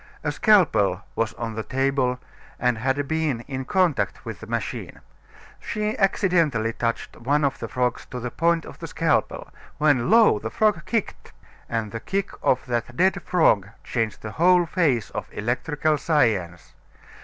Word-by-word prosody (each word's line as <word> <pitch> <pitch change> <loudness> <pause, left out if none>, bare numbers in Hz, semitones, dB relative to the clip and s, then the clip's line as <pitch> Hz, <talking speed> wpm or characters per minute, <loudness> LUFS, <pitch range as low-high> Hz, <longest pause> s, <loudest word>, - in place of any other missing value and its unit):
A 150 - 0
scalpel 140 - +3
was 115 0 -1
on 115 -1 -4
the 110 - -3
table 135 0 0 0.4
and 125 -2 +1
had 135 +4 0
been 155 -6 -1
in 130 +1 -5
contact 180 -2 0
with - - -6
the - - -10
machine. - - -4 0.6
She 215 0 -2
accidentally 170 - +2
touched 115 0 -3
one 145 +5 +1
of 140 - -1
the - - -4
frogs 125 -1 -2
to 125 - -6
the 125 0 -5
point 170 0 +1
of - - -11
the - - -6
scalpel, - - -1 0.3
when, 145 -3 +2
lo! 220 - +6
the 110 - -4
frog 195 - +1
kicked, 225 -4 -3 0.4
and 115 -3 -2
the 115 - -5
kick 195 - -2
of 130 - +1
that 120 0 -3
dead 190 +2 +2
frog 105 - +2
changed 115 -3 -2
the 110 - -5
whole 175 +4 +4
face 155 - 0
of - - -5
electrical 145 +7 -1
science. 105 - 0
135 Hz, 160 wpm, -24 LUFS, 115-170 Hz, 0.6 s, lo